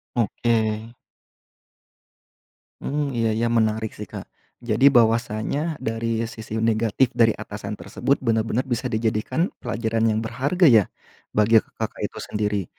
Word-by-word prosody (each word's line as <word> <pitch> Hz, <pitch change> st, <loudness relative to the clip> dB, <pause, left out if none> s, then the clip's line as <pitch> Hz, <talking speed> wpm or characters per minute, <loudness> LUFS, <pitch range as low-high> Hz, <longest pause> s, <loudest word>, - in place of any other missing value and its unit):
Oke. 115 Hz, -1 st, 0 dB, 1.9 s
Mmm, 145 Hz, 0 st, -1 dB
iya 115 Hz, -1 st, +2 dB
iya 115 Hz, +2 st, 0 dB
menarik 110 Hz, -1 st, +1 dB
sih -, -, -6 dB
Kak, -, -, -9 dB, 0.3 s
jadi 120 Hz, +2 st, +1 dB
bahwasanya 120 Hz, +6 st, +1 dB
dari 115 Hz, -1 st, -1 dB
sisi 110 Hz, -1 st, -5 dB
negatif 115 Hz, +3 st, +2 dB
dari 115 Hz, -2 st, +5 dB
atasan -, -, -7 dB
tersebut 140 Hz, -, -1 dB
benar-benar 115 Hz, +1 st, 0 dB
bisa 120 Hz, +2 st, -1 dB
dijadikan 110 Hz, -, 0 dB
pelajaran 115 Hz, 0 st, -1 dB
yang 110 Hz, -1 st, +1 dB
berharga 140 Hz, +10 st, +2 dB
ya, 110 Hz, -6 st, +6 dB, 0.5 s
bagi 110 Hz, +2 st, +5 dB
Kakak -, -, -3 dB
itu -, -, -7 dB
sendiri. 105 Hz, -1 st, -2 dB
115 Hz, 120 wpm, -23 LUFS, 110-120 Hz, 1.9 s, ya